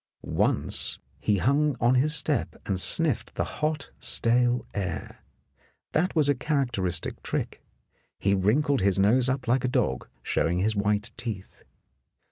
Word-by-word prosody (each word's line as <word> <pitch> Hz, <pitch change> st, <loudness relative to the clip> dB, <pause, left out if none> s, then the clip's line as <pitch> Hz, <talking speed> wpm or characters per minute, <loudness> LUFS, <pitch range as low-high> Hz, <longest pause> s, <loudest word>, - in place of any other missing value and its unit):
Once -, -, 0 dB, 0.2 s
he 105 Hz, -, +1 dB
hung 140 Hz, +7 st, +2 dB
on 120 Hz, +1 st, +3 dB
his 145 Hz, +5 st, +3 dB
step 145 Hz, -2 st, -1 dB
and 95 Hz, -2 st, -1 dB
sniffed 125 Hz, -, +2 dB
the -, -, 0 dB
hot, 150 Hz, -2 st, -3 dB
stale 120 Hz, +1 st, +2 dB
air. 90 Hz, -5 st, -4 dB, 0.7 s
That 175 Hz, +4 st, 0 dB
was 155 Hz, -3 st, +3 dB
a 145 Hz, -, +4 dB
characteristic 120 Hz, -, -1 dB
trick; -, -, -3 dB, 0.6 s
he 100 Hz, -, +1 dB
wrinkled 120 Hz, +8 st, +2 dB
his 100 Hz, 0 st, +2 dB
nose 120 Hz, +6 st, +4 dB
up 130 Hz, -1 st, -2 dB
like 125 Hz, +2 st, +2 dB
a -, -, +1 dB
dog, 65 Hz, -, -1 dB, 0.2 s
showing 85 Hz, +2 st, 0 dB
his 105 Hz, +4 st, +1 dB
white 105 Hz, +1 st, 0 dB
teeth. 105 Hz, -6 st, -6 dB
120 Hz, 140 wpm, -26 LUFS, 100-140 Hz, 0.7 s, a